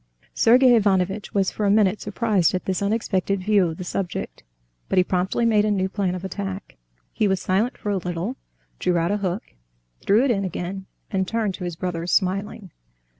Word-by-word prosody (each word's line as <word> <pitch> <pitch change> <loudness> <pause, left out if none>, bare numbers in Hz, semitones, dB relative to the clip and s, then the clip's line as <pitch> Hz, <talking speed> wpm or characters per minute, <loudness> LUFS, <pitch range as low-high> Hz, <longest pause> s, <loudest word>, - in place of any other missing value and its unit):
Sergey 250 +2 +5
Ivanovitch 200 -2 +1
was 195 -2 +2
for 215 - -4
a 200 - +3
minute 205 -1 +3
surprised 210 -5 +1
at 185 - -3
this 190 0 -1
unexpected 200 -2 0
view 200 -3 +3
of 160 -1 -5
the 185 - -5
subject; 180 0 -4 0.5
but - - 0
he 185 - +6
promptly 185 +6 0
made 215 -2 +4
a 215 - +1
new 190 -2 +1
plan 190 -2 -1
of 185 +1 -6
attack. 195 0 -5 0.4
He 215 - +1
was 190 -1 +1
silent 200 +8 0
for 205 - -3
a 200 - +1
little, 180 +6 -3 0.4
drew 180 -1 +1
out 170 +3 +1
a 205 - +1
hook, 190 0 -2 0.6
threw 220 +6 +3
it 270 - +2
in 200 -4 0
again, 190 +1 -5 0.2
and 190 -2 0
turned 220 -3 -1
to 180 0 -6
his 175 -2 -4
brother 170 -1 -4
smiling. 195 +1 -1
195 Hz, 195 wpm, -23 LUFS, 185-210 Hz, 0.6 s, he